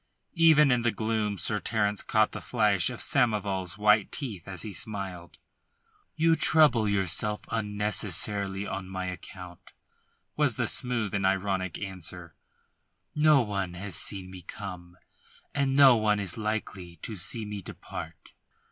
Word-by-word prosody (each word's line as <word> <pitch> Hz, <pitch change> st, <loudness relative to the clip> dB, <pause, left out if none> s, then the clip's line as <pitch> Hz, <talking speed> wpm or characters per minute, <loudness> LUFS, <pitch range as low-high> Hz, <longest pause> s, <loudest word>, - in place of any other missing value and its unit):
Even 155 Hz, -4 st, +5 dB
in 125 Hz, -1 st, +2 dB
the 120 Hz, -, +2 dB
gloom 110 Hz, -1 st, -1 dB
Sir 105 Hz, +2 st, +2 dB
Terence 105 Hz, -2 st, 0 dB
caught 110 Hz, 0 st, +2 dB
the -, -, -7 dB
flash 105 Hz, -7 st, +2 dB
of 125 Hz, -, -5 dB
Samoval's 100 Hz, -8 st, 0 dB
white 105 Hz, 0 st, +3 dB
teeth 110 Hz, -, -5 dB
as 95 Hz, -3 st, -5 dB
he 105 Hz, -, -6 dB
smiled. 95 Hz, -5 st, -5 dB, 0.8 s
"You 165 Hz, +1 st, +3 dB
trouble 145 Hz, -9 st, +4 dB
yourself 100 Hz, +2 st, 0 dB
unnecessarily 105 Hz, -2 st, 0 dB
on 95 Hz, -2 st, -5 dB
my 95 Hz, -1 st, -4 dB
account," 90 Hz, -1 st, -9 dB, 0.6 s
was -, -, +1 dB
the -, -, +1 dB
smoothly 110 Hz, -5 st, 0 dB
ironic 95 Hz, -2 st, 0 dB
answer. 90 Hz, -3 st, -7 dB, 0.8 s
"No 150 Hz, -2 st, +5 dB
one 100 Hz, -4 st, -3 dB
has 95 Hz, -1 st, -5 dB
seen 95 Hz, -1 st, -2 dB
me 95 Hz, -1 st, -9 dB
come, 90 Hz, +1 st, -9 dB, 0.6 s
and 140 Hz, -1 st, 0 dB
no 135 Hz, -3 st, +8 dB
one 105 Hz, -2 st, +1 dB
is 95 Hz, -4 st, -3 dB
likely 105 Hz, -5 st, -4 dB
to 110 Hz, -, -5 dB
see 110 Hz, +5 st, -1 dB
me 105 Hz, -1 st, -6 dB
depart." 80 Hz, -3 st, -9 dB
105 Hz, 140 wpm, -28 LUFS, 95-110 Hz, 0.8 s, no